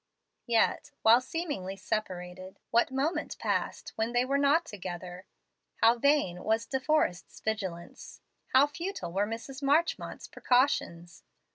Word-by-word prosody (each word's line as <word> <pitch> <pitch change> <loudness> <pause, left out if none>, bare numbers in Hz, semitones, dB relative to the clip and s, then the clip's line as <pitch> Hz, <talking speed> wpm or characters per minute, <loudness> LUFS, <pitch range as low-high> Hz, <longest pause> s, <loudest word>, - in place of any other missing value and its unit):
Yet, 230 -2 +2
while 230 +3 +7
seemingly 270 - -4
separated, 185 -2 -5
what 235 +1 +3
moment 270 +5 -2
passed - - -2
when 225 +2 -1
they 245 +1 +3
were 275 +2 +1
not 290 +4 +3
together? 185 - -7 0.5
How 230 +1 +4
vain 255 -11 +2
was 225 +1 +1
De 265 - -2
Forrest's 260 - 0
vigilance! 190 -6 -5 0.3
how 265 +2 +5
futile 335 - -5
were 200 +2 +1
Mrs. 245 +5 -7
Marchmont's 295 +5 0
precautions! 175 -10 0
230 Hz, 125 wpm, -29 LUFS, 185-280 Hz, 0.5 s, while